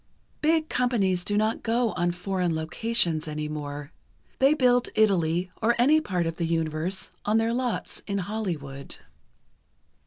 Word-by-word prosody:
Big 315 0 +2
companies 205 - +1
do 205 +2 0
not 215 +1 +1
go 230 0 +1
on 175 -1 0
foreign 180 -1 -1
locations 165 0 0
any 150 0 -3
more. 145 0 -6 0.5
They 275 +3 +5
build 245 -3 +3
Italy 180 -4 +2
or 235 +2 +3
any 295 +6 +5
part 180 - -1
of 165 0 -3
the 170 - -1
universe 165 +3 -1
on 210 +1 +2
their 225 +1 +1
lots 245 -1 -2
in 200 -1 -1
Hollywood. 175 -9 -4
190 Hz, 145 wpm, -26 LUFS, 165-230 Hz, 0.5 s, They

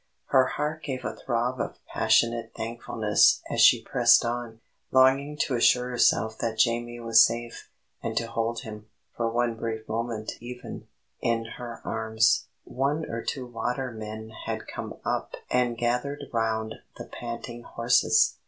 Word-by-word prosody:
Her 130 -1 +5
heart 150 +3 -3
gave 135 -3 -5
a - - -3
throb 120 +1 -1
of - - -4
passionate 115 0 +1
thankfulness 110 -2 +2
as - - +1
she - - +7
pressed - - +5
on, 120 -1 -4 0.3
longing 135 +3 +4
to 135 - 0
assure 125 +1 +3
herself 110 -2 +2
that 115 -1 -2
Jamie 120 0 +1
was 115 -1 +6
safe, 115 0 -3 0.3
and - - -3
to 115 - +1
hold 115 0 -2
him, 105 -1 -9 0.3
for 115 -1 0
one 120 0 0
brief 110 -1 -5
moment 115 -1 -4
even, 125 +1 -8 0.3
in 115 -1 0
her 120 -1 -7
arms. 110 0 +1 0.2
One 145 +4 -1
or 115 0 -3
two 130 -2 -3
watermen 115 -3 -4 0.2
had - - -3
come - - -6
up - - -2 0.2
and 125 -1 +1
gathered 125 +5 -1
round 110 -1 -1 0.2
the - - -7
panting 120 0 -7
horses. 120 +1 +3
115 Hz, 145 wpm, -27 LUFS, 115-125 Hz, 0.3 s, she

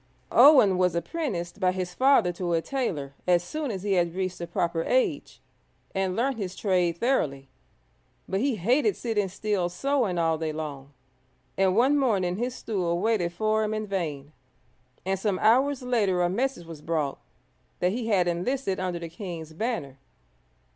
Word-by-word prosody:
Owen 230 -11 +7
was 180 -2 +2
apprenticed 175 - -3
by 185 -2 +3
his 185 -1 -4
father 255 -5 +4
to 175 0 -3
a 165 - +2
tailor 165 - -3
as 175 -1 +4
soon 300 - -4
as 195 -4 -4
he 205 -1 0
had 175 -2 +1
reached 185 -1 -3
the 170 - -5
proper 170 -1 -1
age, 255 +7 0 0.5
and 190 -1 -1
learnt 255 +3 0
his 190 -3 -4
trade 180 -4 +1
thoroughly. 145 - 0 0.8
But 190 - -1
he 265 +1 +1
hated 250 - +2
sitting 210 -5 -1
still 195 -2 -1
sewing 240 -1 0
all 165 -1 +1
day 160 -1 -2
long, 145 -3 -6 0.6
and 190 -1 +2
one 275 +5 +4
morning 190 -9 +1
his 245 +3 -2
stool 180 -8 -2
waited 205 -4 +1
for 215 +4 0
him 215 0 -1
in 215 0 -3
vain, 155 -8 -4 0.7
and 190 0 -1
some 200 -2 0
hours 255 +6 +3
later 205 -8 +1
a 175 - +2
message 245 -3 -1
was 165 -2 -10
brought 155 -3 -2 0.6
that 180 - +2
he 230 +2 -3
had 190 -5 +2
enlisted 190 +4 -1
under 185 -2 -2
the 170 0 -6
king's 165 -2 -7
banner. 160 - -3
185 Hz, 170 wpm, -26 LUFS, 170-230 Hz, 0.8 s, Owen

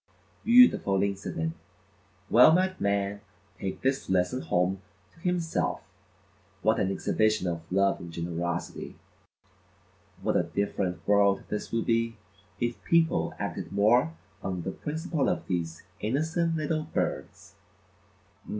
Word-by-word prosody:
Beautiful 230 - +6
incident; 95 -5 -2 0.7
well 125 +6 +7
might 185 +2 +1
man 100 0 0 0.4
take 95 -1 -5
this 135 +1 0
lesson 95 +7 +1
home 90 +2 0 0.3
to - - -22
himself; 175 -2 -1 0.8
what - - +3
an 95 - +1
exhibition 110 0 +1
of 85 -1 -2
love 100 +1 +2
and 85 - -8
generosity; 85 +1 -4 1.3
what - - +1
a - - +4
different 100 -2 -2
world 100 -1 +4
this 105 - -4
would 115 0 0
be 115 0 +1 0.4
if 120 -1 -2
people 165 -1 +2
acted - - -4
more 120 +11 +3 0.3
on 90 -3 -3
the 95 - -3
principle 155 - -2
of - - -2
these 85 -3 -3 0.2
innocent 160 +8 0
little 155 0 -1
birds! 155 - -4
100 Hz, 120 wpm, -28 LUFS, 95-155 Hz, 1.3 s, well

